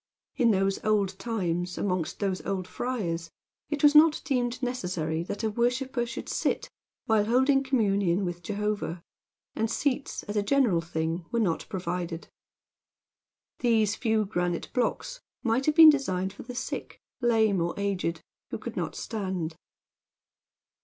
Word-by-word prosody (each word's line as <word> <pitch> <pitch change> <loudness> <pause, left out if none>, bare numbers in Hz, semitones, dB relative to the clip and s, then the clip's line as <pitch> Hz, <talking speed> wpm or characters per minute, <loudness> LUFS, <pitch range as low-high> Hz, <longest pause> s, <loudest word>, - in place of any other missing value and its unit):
In 240 -4 +3
those 195 -2 +1
old 200 -3 +1
times, 180 -5 -2
and - - -1
amongst 180 -4 -1
those 195 -3 -1
old 185 -2 -2
friars, 175 -11 -3 0.4
it 295 -1 -3
was 295 0 +7
not 305 +1 +7
deemed 250 -2 -1
necessary 180 -10 -2
that 200 +5 -5
a 220 - +2
worshiper 245 +2 0
should 235 - -6
sit - - -1 0.3
while 220 -2 +3
holding 265 +4 +4
communion 200 -8 +1
with 175 -1 -4
Jehovah; 205 -2 -3 0.5
and 225 0 0
seats, 275 +3 -1
as 205 - -6
a 210 - +3
general 205 -6 +3
thing, 165 +1 -3
were 235 - +1
not 180 -8 0
provided. 175 -2 -4 1.3
These 220 -4 +2
few 220 -3 +1
granite 175 -3 -2
blocks - - -1 0.2
might 240 +3 +1
have 305 - +3
been 320 -2 +11
designed 190 -10 -1
for - - -10
the 250 - -8
sick, - - -5 0.2
lame, 220 -6 +3
or 170 +3 -2
aged, 185 -5 -1 0.3
who - - -4
could - - -7
not - - -3
stand. 185 -7 -3
205 Hz, 145 wpm, -28 LUFS, 180-245 Hz, 1.3 s, been